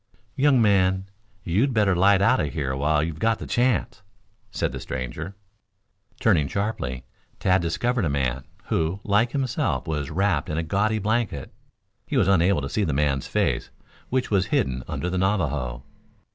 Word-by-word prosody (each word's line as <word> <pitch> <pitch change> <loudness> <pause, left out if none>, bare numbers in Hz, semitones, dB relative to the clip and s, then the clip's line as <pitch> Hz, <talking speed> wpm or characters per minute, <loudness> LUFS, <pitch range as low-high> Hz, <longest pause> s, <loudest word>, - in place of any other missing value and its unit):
"Young 135 -1 +4
man, 95 -3 +2 0.3
you'd 115 +10 +1
better 100 -4 +3
light 100 +2 +4
out 125 +6 +4
of 75 -2 -2
here 70 -4 -2
while 75 +2 +1
you've 80 -1 -4
got 115 +2 +2
the - - -7
chance," 120 -4 0 0.5
said - - -2
the - - -6
stranger. 75 +9 -5 0.8
Turning 85 -11 +3
sharply, 85 - -3 0.3
Tad 95 -1 +2
discovered 115 +7 0
a - - 0
man, 65 -2 -1 0.2
who, 80 +4 -1
like 105 +3 +2
himself, 130 - -1
was 75 -3 -2
wrapped 85 -3 0
in 75 - -2
a 80 - 0
gaudy 105 +6 +1
blanket. 105 - -1 0.5
He - - -1
was - - +3
unable 95 -3 +3
to 70 - -3
see 105 - 0
the 80 -7 0
man's 70 -2 0
face, - - 0 0.4
which 130 -2 -1
was 95 -2 +2
hidden 65 -1 0
under 90 - -3
the 90 +1 -1
Navajo. 75 -11 -1
95 Hz, 165 wpm, -24 LUFS, 75-105 Hz, 0.8 s, Young